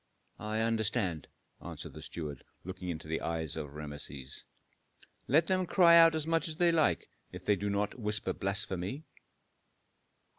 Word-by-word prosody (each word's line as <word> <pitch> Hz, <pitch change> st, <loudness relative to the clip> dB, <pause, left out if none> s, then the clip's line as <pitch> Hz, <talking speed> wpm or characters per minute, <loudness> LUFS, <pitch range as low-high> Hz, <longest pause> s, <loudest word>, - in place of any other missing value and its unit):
"I 110 Hz, +1 st, -1 dB
understand," 110 Hz, -, 0 dB, 0.4 s
answered -, -, -7 dB
the -, -, -9 dB
steward, 75 Hz, -5 st, -6 dB, 0.2 s
looking 90 Hz, 0 st, -6 dB
into 80 Hz, -2 st, -5 dB
the 80 Hz, +1 st, -2 dB
eyes 80 Hz, -2 st, -2 dB
of 75 Hz, -1 st, -6 dB
Rameses. 75 Hz, -3 st, -8 dB, 0.8 s
"Let 155 Hz, +5 st, +4 dB
them 185 Hz, -1 st, +1 dB
cry 170 Hz, -2 st, +6 dB
out 165 Hz, -1 st, +8 dB
as 155 Hz, -1 st, 0 dB
much 165 Hz, +1 st, +1 dB
as 160 Hz, -, -3 dB
they 175 Hz, 0 st, +4 dB
like 150 Hz, -, +2 dB, 0.2 s
if -, -, -9 dB
they 105 Hz, -, +4 dB
do 100 Hz, +2 st, -2 dB
not 105 Hz, +4 st, -1 dB
whisper 105 Hz, -3 st, -2 dB
blasphemy." 95 Hz, -, -2 dB
100 Hz, 150 wpm, -32 LUFS, -, 0.8 s, out